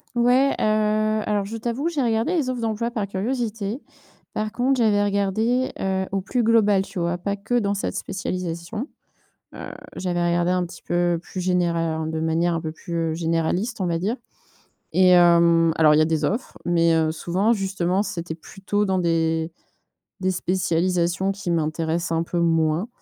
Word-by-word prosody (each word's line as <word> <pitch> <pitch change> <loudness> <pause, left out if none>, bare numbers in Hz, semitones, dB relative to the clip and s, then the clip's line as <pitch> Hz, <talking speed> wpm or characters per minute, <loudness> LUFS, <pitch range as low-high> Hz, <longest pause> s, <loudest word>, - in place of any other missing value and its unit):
Ouais, 250 +3 +4
heu, - - 0 0.6
alors, 205 -2 0
je 220 - -6
t'avoue, 240 +7 -2
j'ai 315 -5 -1
regardé 230 +9 +1
les 275 -6 0
offres 250 -1 -2
d'emploi 225 +1 -2
par 215 -4 -2
curiosité. 220 +2 -3 0.5
Par 215 0 -2
contre, 260 +4 +1
j'avais 210 -3 +3
regardé, 215 +6 +1
heu, 190 0 0
au 195 - 0
plus 240 +5 -1
global, 215 -3 +4
tu 195 -1 -6
vois? 170 +1 0
Pas 200 +3 -3
que 245 +4 0
dans 200 -2 0
cette 200 - -3
spécialisation, 185 - -4 0.6
heu, - - -8 0.3
j'avais 175 -2 -1
regardé 175 0 +1
un 180 -1 +1
petit 175 - -11
peu 175 -1 0
plus 185 - -8
généra 170 -3 0
de 160 0 -3
manière 165 +2 +1
un 165 - -2
peu 160 -1 -4
plus, 170 +2 -7 0.2
heu, - - -1
généraliste, 165 +7 -1
on 185 - +1
va 165 -1 0
dire 210 +6 -1 0.8
et 185 -1 +6
hem, 170 -2 +5
alors 155 -2 +5
il 150 - +4
y - - +5
a - - +4
des 160 -1 0
offres 220 - -3
mais 170 -1 +3
heu, 160 -1 +2
souvent, 185 +7 +1
justement, 190 -2 0
c'était 170 -5 -5
plutôt 200 +4 -3
dans 190 -1 +1
des 165 -1 0 0.7
des 185 - +1
spécialisations 180 0 0
qui 195 -2 -5
m'intéressent 165 +1 -1
un 165 0 +1
peu 175 - -3
moins, 165 +3 +1
185 Hz, 175 wpm, -23 LUFS, 170-215 Hz, 0.8 s, et